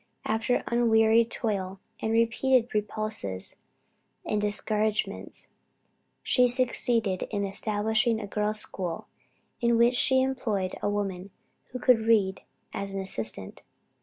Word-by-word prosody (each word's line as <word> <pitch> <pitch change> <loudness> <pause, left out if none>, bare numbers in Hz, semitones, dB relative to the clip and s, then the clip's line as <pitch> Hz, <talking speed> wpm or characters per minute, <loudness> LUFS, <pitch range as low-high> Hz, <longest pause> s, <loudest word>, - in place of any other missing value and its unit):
After 225 +3 0
unwearied 230 -1 +3
toil, 195 -5 -2 0.2
and 220 - -2
repeated 235 +2 +2
repulses 210 - -3 0.7
and 210 -1 -1
discouragements, 210 +1 -1 0.7
she 250 -1 +3
succeeded 240 -5 0
in 200 -2 -2
establishing 220 +3 0
a 215 - -5
girls' 210 +1 0
school, 180 -3 -3 0.6
in 235 -1 +3
which 235 +1 +4
she 260 +1 +3
employed 220 -8 -2
a - - 0
woman 195 -2 -3 0.4
who 250 - -7
could 250 -2 +4
read, 215 -4 +2 0.3
as 195 0 -5
an - - -2
assistant. 110 - -3
215 Hz, 115 wpm, -27 LUFS, 200-235 Hz, 0.7 s, which